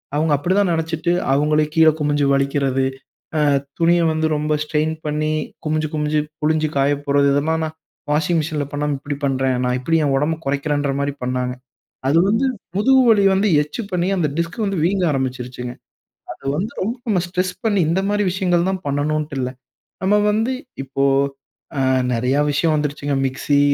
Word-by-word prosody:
அவங்க 155 Hz, +1 st, +1 dB
அப்படிதான் 185 Hz, +5 st, +1 dB
நினைச்சுட்டு 160 Hz, +1 st, -1 dB, 0.2 s
அவங்களே 150 Hz, +2 st, +2 dB
கீழே 160 Hz, -1 st, +6 dB
குமிஞ்சு 145 Hz, -1 st, +1 dB
வழிக்கிறது. 135 Hz, -1 st, +1 dB, 0.9 s
துணியை 170 Hz, +1 st, +4 dB
வந்து 160 Hz, 0 st, 0 dB
ரொம்ப 150 Hz, +1 st, 0 dB
ஸ்ட்ரெயின் 155 Hz, +1 st, 0 dB
பண்ணி, 155 Hz, +1 st, -1 dB, 0.3 s
குமிஞ்சு 155 Hz, 0 st, 0 dB
குமிஞ்சு 150 Hz, 0 st, 0 dB, 0.2 s
புழிஞ்சி 155 Hz, 0 st, +1 dB
காய 140 Hz, +1 st, +3 dB
போடுறது. 140 Hz, 0 st, +3 dB
இதெல்லாம் 160 Hz, +3 st, +1 dB
நான் 155 Hz, 0 st, -7 dB, 0.4 s
வாஷிங் 160 Hz, +3 st, +2 dB
மிஷின்ல 150 Hz, -1 st, -2 dB
பண்ணாம 145 Hz, 0 st, -1 dB
இப்டி 145 Hz, +1 st, -5 dB
பண்றேன். 130 Hz, -1 st, +1 dB
நான் 125 Hz, 0 st, +1 dB
இப்டி 165 Hz, +6 st, +1 dB
என் 140 Hz, -, +1 dB
உடம்ப 155 Hz, +3 st, 0 dB
குறைக்கிறேன்ற 145 Hz, +1 st, 0 dB
மாரி 140 Hz, 0 st, -1 dB
பண்ணாங்க. 125 Hz, 0 st, -1 dB, 0.6 s
அது 150 Hz, +4 st, +4 dB
வந்து 225 Hz, +6 st, +2 dB, 0.3 s
முதுகு 260 Hz, +6 st, +5 dB
வலிய 205 Hz, -3 st, +5 dB
வந்து 200 Hz, +2 st, +2 dB
எக்ஸ்ட்ரா 150 Hz, +10 st, -5 dB
பண்ணி, 180 Hz, 0 st, 0 dB
அந்த 165 Hz, -5 st, +1 dB
டிஸ்க் 170 Hz, +5 st, -2 dB
வந்து 195 Hz, -3 st, -1 dB
வீங்க 190 Hz, +2 st, +1 dB
ஆரம்பிச்சிருச்சுங்க. 125 Hz, -2 st, -3 dB, 0.6 s
அது -, -, -15 dB
வந்து 205 Hz, +8 st, -2 dB
ரொம்ப 230 Hz, +6 st, -2 dB, 0.2 s
ம் 180 Hz, -, +2 dB
ஸ்ட்ரெஸ் 180 Hz, +1 st, -1 dB
பண்ணி 205 Hz, -3 st, +2 dB
இந்த 170 Hz, +4 st, +2 dB
மாதிரி 205 Hz, 0 st, +1 dB
விஷயங்கள் 180 Hz, -1 st, +1 dB
தான் 190 Hz, -1 st, -3 dB
பண்ணனும்ட்டு 150 Hz, +1 st, -1 dB
இல்ல. 125 Hz, 0 st, -1 dB, 0.5 s
நம்ம 195 Hz, +2 st, +3 dB
வந்து 225 Hz, +4 st, +1 dB, 0.3 s
இப்போ 135 Hz, +1 st, -1 dB, 0.8 s
அ -, -, +2 dB, 0.3 s
நிறைய 125 Hz, +4 st, +1 dB
விஷயம் 155 Hz, +2 st, +1 dB
வந்துருச்சுங்க. 145 Hz, -1 st, -2 dB
மிக்ஸி, 140 Hz, +2 st, +1 dB
155 Hz, 160 wpm, -20 LUFS, 140-175 Hz, 0.9 s, கீழே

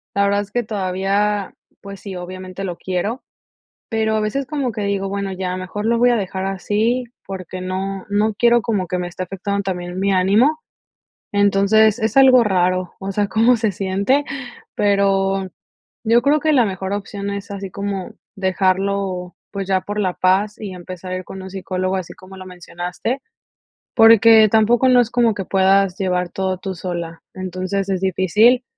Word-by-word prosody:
la 200 Hz, -, +3 dB
verdad 200 Hz, 0 st, +2 dB
es 200 Hz, -, -8 dB
que 245 Hz, +3 st, -1 dB
todavía, 200 Hz, 0 st, -1 dB, 0.3 s
pues 200 Hz, -1 st, -9 dB
sí, 195 Hz, -2 st, -8 dB
obviamente 185 Hz, +1 st, -7 dB
lo 180 Hz, -3 st, -3 dB
quiero, 190 Hz, +8 st, -3 dB, 0.7 s
pero 220 Hz, -1 st, 0 dB
a -, -, +1 dB
veces 235 Hz, +6 st, -1 dB
como 265 Hz, -4 st, -2 dB
que 215 Hz, -, -4 dB
digo: 200 Hz, -1 st, -1 dB
"Bueno 200 Hz, 0 st, -3 dB
ya, 185 Hz, -1 st, -3 dB
mejor 185 Hz, +3 st, -5 dB
lo 230 Hz, +1 st, +2 dB
voy 245 Hz, 0 st, +5 dB
a 240 Hz, -, +3 dB
dejar 190 Hz, -2 st, -3 dB
así", 215 Hz, +6 st, 0 dB, 0.2 s
porque 185 Hz, -1 st, -7 dB
no, 190 Hz, +1 st, -4 dB
no 210 Hz, +1 st, +1 dB
quiero 235 Hz, +2 st, +4 dB
como 200 Hz, -5 st, -1 dB
que 180 Hz, -, -2 dB
me 180 Hz, 0 st, -3 dB
esté 180 Hz, +1 st, -5 dB
afectando 200 Hz, +2 st, -3 dB
también 180 Hz, -2 st, -4 dB
mi 200 Hz, 0 st, +1 dB
ánimo. 210 Hz, +12 st, +3 dB, 0.7 s
Entonces 205 Hz, +2 st, +4 dB
es 220 Hz, +3 st, -1 dB
algo 260 Hz, -3 st, +7 dB
raro, 185 Hz, -2 st, 0 dB
o 195 Hz, 0 st, -4 dB
sea, 205 Hz, +1 st, 0 dB
cómo 230 Hz, +4 st, +4 dB
se 220 Hz, -2 st, 0 dB
siente, 200 Hz, +9 st, 0 dB, 0.5 s
pero 195 Hz, -1 st, +2 dB, 0.6 s
yo 235 Hz, +2 st, +4 dB
creo 290 Hz, +3 st, +3 dB
que 310 Hz, -1 st, +2 dB
la 250 Hz, -5 st, +4 dB
mejor 190 Hz, 0 st, -3 dB
opción 200 Hz, 0 st, -4 dB
es 200 Hz, 0 st, -6 dB
así 195 Hz, -2 st, -6 dB
como 200 Hz, -2 st, -4 dB, 0.2 s
dejarlo, 190 Hz, -1 st, -1 dB, 0.2 s
pues, 195 Hz, -1 st, -4 dB
ya 190 Hz, -1 st, +1 dB
por 205 Hz, +1 st, -4 dB
la 185 Hz, -3 st, 0 dB
paz 195 Hz, +3 st, +2 dB
y 200 Hz, -4 st, -6 dB
empezar 185 Hz, 0 st, -8 dB
a -, -, -1 dB
ir 185 Hz, -, -6 dB
con 190 Hz, -, -8 dB
un 190 Hz, -, -8 dB
psicólogo, 185 Hz, 0 st, -2 dB
así 185 Hz, -, -6 dB
como 190 Hz, 0 st, -14 dB
lo 185 Hz, -, -9 dB
mencionaste, 180 Hz, +8 st, -5 dB, 0.7 s
porque 225 Hz, -1 st, +7 dB
tampoco 230 Hz, +4 st, +3 dB
no 250 Hz, -1 st, +6 dB
es 230 Hz, -1 st, -2 dB
como 235 Hz, -3 st, +3 dB
que 195 Hz, -, -4 dB
puedas 195 Hz, 0 st, +3 dB
llevar 180 Hz, -2 st, -1 dB
todo 190 Hz, 0 st, -2 dB
tú 190 Hz, +1 st, -5 dB
sola, 170 Hz, -2 st, -5 dB
entonces, 185 Hz, +1 st, -3 dB
es 190 Hz, -2 st, -1 dB
difícil, 205 Hz, +7 st, +3 dB
195 Hz, 180 wpm, -20 LUFS, 185-215 Hz, 0.7 s, algo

